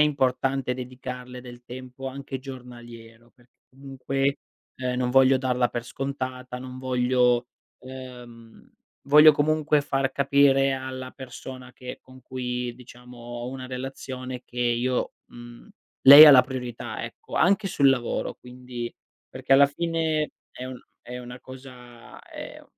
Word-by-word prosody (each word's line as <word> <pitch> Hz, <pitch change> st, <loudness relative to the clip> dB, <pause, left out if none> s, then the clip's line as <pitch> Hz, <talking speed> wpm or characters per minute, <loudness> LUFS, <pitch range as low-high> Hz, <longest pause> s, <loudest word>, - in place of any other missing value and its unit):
importante 135 Hz, -2 st, 0 dB
dedicarle 125 Hz, 0 st, -8 dB
del 120 Hz, -1 st, -12 dB
tempo 130 Hz, +1 st, -8 dB
anche 135 Hz, 0 st, -6 dB
giornaliero, 120 Hz, -3 st, -12 dB
perché 125 Hz, 0 st, -27 dB, 0.2 s
comunque, 135 Hz, +1 st, -2 dB, 0.4 s
ehm, 125 Hz, -1 st, -3 dB
non 125 Hz, -1 st, 0 dB
voglio 135 Hz, +1 st, +5 dB
darla 125 Hz, -1 st, +1 dB
per 120 Hz, -, -4 dB
scontata, 130 Hz, -1 st, -5 dB
non 130 Hz, 0 st, -9 dB
voglio, 125 Hz, -1 st, +2 dB, 0.3 s
ehm, 125 Hz, -3 st, -12 dB, 0.4 s
voglio 150 Hz, +2 st, +8 dB
comunque 150 Hz, 0 st, +2 dB
far 135 Hz, -1 st, -1 dB
capire 140 Hz, -1 st, +3 dB
alla 130 Hz, -1 st, -5 dB
persona 130 Hz, -1 st, -10 dB
che 125 Hz, 0 st, -9 dB
con 130 Hz, 0 st, -17 dB
cui 125 Hz, -1 st, -4 dB
diciamo 125 Hz, 0 st, -14 dB
ho 120 Hz, +1 st, -7 dB
una 130 Hz, -1 st, -7 dB
relazione 130 Hz, 0 st, -6 dB
che 125 Hz, -, -11 dB
io 120 Hz, +1 st, 0 dB
mhmm, 120 Hz, -, -13 dB, 0.3 s
lei 140 Hz, +3 st, +12 dB
ha 150 Hz, -, +11 dB
la 130 Hz, -2 st, +8 dB
priorità, 125 Hz, -2 st, -6 dB
ecco, -, -, -10 dB
anche 195 Hz, +3 st, +3 dB
sul 140 Hz, -6 st, +3 dB
lavoro 125 Hz, -3 st, -2 dB
quindi 125 Hz, -1 st, -8 dB, 0.3 s
perché -, -, -2 dB
alla 140 Hz, +1 st, +7 dB
fine 160 Hz, 0 st, -1 dB, 0.2 s
è 125 Hz, -, -8 dB
un 130 Hz, -1 st, -8 dB, 0.3 s
è 125 Hz, 0 st, -7 dB
una 125 Hz, 0 st, -10 dB
cosa 125 Hz, -2 st, -13 dB
è -, -, -10 dB
130 Hz, 135 wpm, -25 LUFS, 125-135 Hz, 0.4 s, lei